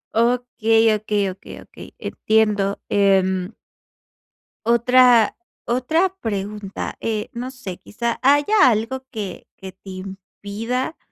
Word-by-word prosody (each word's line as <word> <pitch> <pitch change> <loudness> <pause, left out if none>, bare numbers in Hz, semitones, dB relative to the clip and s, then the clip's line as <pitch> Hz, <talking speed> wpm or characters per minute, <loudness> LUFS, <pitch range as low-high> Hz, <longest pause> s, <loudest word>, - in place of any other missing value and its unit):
Okey, 225 -2 +2
okey, 210 -2 0
okey, 190 - -12
okey, - - -12
entiendo. 210 -2 0
Em 190 0 +2 1.1
otra 240 0 +5 0.3
otra 315 +10 +1
pregunta, 205 -1 -4
eh, 215 -2 -3
no 245 +2 -5
sé, 205 -9 -8
quizá, 235 +2 -4
¿haya 290 +7 +5
algo 240 +4 -2
que 205 -7 -6
que 190 0 -9
te 190 +1 -14
impida, 200 - -5
220 Hz, 105 wpm, -21 LUFS, 200-250 Hz, 1.1 s, otra